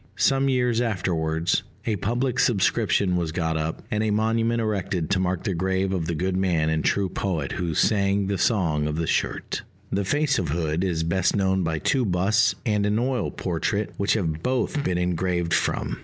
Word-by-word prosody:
Some 135 0 +3
years 125 -2 +1
afterwards, 85 -6 0 0.2
a 110 - 0
public 120 +6 -1
subscription 100 -3 +2
was 85 -3 -1
got 80 -1 -1
up, 80 0 -3
and 105 - 0
a 110 - +1
monument 115 +2 +1
erected 100 -6 -2
to 95 - +2
mark 90 -1 -1
the 95 - -1
grave 95 +2 0
of 85 -4 -2
the 85 - -1
good 90 +3 -1
man 85 -5 +1
and 80 -1 0
true 100 -1 +1
poet 85 -6 -2
who 85 -3 -2
"sang 100 0 +2
the 100 0 -2
Song 80 -9 +1
of 75 - -2
the 85 +1 -1
Shirt." - - -1 0.3
The 100 +1 0
face 145 +6 +1
of - - -2
Hood 80 +2 -1
is 85 -4 0
best 95 +3 +1
known 95 -2 +1
by 80 -2 -1
two 130 - +1
busts 100 +3 +2
and 105 -2 +1
an 105 +1 +1
oil 125 -3 0
portrait 95 +4 -2
which 100 +2 +1
have 80 -7 -1
both 130 - 0
been 90 -1 0
engraved 90 -1 0
from. 90 - 0
95 Hz, 190 wpm, -24 LUFS, 85-110 Hz, 0.3 s, Some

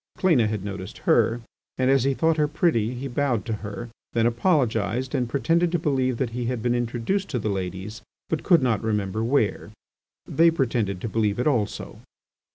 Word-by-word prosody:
Cléna 155 - +3
had 105 -2 -3
noticed 95 -2 -6
her, 120 +1 +3 0.4
and, 130 0 +2
as 135 -2 +3
he 135 0 +2
thought 160 +2 +2
her 150 -1 +3
pretty, 145 -7 +1
he 130 +3 -5
bowed 125 -4 0
to 115 - -2
her, 105 +3 -6 0.3
then 115 -1 +2
apologised 120 - +1
and 125 -4 0
pretended 165 +6 +1
to 175 - +2
believe 135 -6 0
that 125 -2 -1
he 120 +1 -3
had 120 -2 -2
been 120 - +2
introduced 120 - -1
to 130 - -1
the 110 -2 -2
ladies, 95 +2 -4 0.3
but 160 - -2
could 170 -7 +4
not 115 -5 +1
remember 105 -1 -1
where. 115 -4 0 0.6
They 165 +1 +4
pretended 115 - -1
to - - -3
believe 105 -2 0
it 125 - -1
also. 120 -9 -1
120 Hz, 185 wpm, -24 LUFS, 110-140 Hz, 0.6 s, could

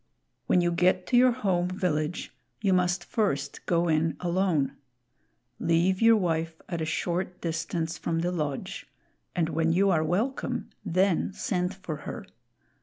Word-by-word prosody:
When 180 - +4
you 175 0 +2
get 180 +2 +2
to 250 - +1
your 250 +1 +6
home 190 -7 0
village, 175 -3 -2 0.2
you 195 -3 +2
must 180 0 +2
first 145 - -1
go 170 0 +2
in 160 0 +1
alone. 175 -5 +1 0.8
Leave 175 +4 +2
your 225 0 +7
wife 165 -3 -1
at 170 -3 -3
a - - 0
short 180 +3 -2
distance 165 0 -2
from 165 -1 -1
the 175 +1 0
lodge, 150 -6 -4 0.5
and 165 -2 +1
when 165 +1 +1
you 195 +3 +3
are 160 -3 +2
welcome, 210 - -1
then 185 +2 +1
send 185 -4 -1
for 185 -5 -5
her. - - -7
175 Hz, 150 wpm, -27 LUFS, 165-185 Hz, 0.8 s, your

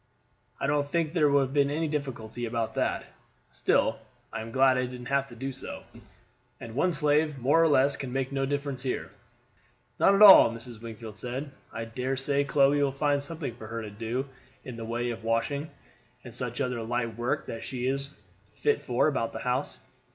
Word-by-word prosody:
"I - - -1
don't 145 0 +1
think 165 +1 -1
there 155 -4 +4
would 140 0 +4
have 135 0 -2
been 140 -1 +3
any 160 +3 -1
difficulty 120 -6 -4
about 115 -1 -2
that. - - -1 0.5
Still - - +1 0.3
I 115 - -3
am 110 - -7
glad 130 +1 +4
I 130 - 0
didn't 125 -1 -8
have 140 0 +2
to 120 - -12
do 135 +3 -4
so, - - -8 0.8
and 115 -1 -8
one 160 +9 +2
slave 150 -1 +2
more 135 +6 +3
or 165 - +5
less 140 -2 +4
can 130 -2 -5
make 135 0 -2
no 135 -1 -1
difference 140 -2 -3
here." 130 -1 -3 0.9
"Not 200 - +5
at 205 - +6
all," 195 - +11
Mrs. 115 -1 -7
Wingfield 110 -2 -8
said; 130 +5 -5 0.2
"I 115 0 -5
dare 125 +4 -3
say 140 +1 +1
Chloe 140 0 +3
will 140 -1 +2
find 145 +1 +1
something 145 -3 -5
for 110 - -9
her 115 0 -5
to 105 - -7
do 115 +6 -3 0.4
in 125 - -7
the 115 -1 -6
way 120 +1 -2
of 115 - -7
washing, 115 +7 -1 0.5
and - - -10
such - - -3
other 125 -2 -1
light 115 0 -2
work 120 +2 -1
that 115 - -6
she 125 -1 -4
is 140 +1 -1 0.5
fit 440 0 +1
for 125 +3 +1
about 135 -6 -1
the - - -5
house. 125 +3 -1
130 Hz, 200 wpm, -28 LUFS, 115-145 Hz, 0.9 s, all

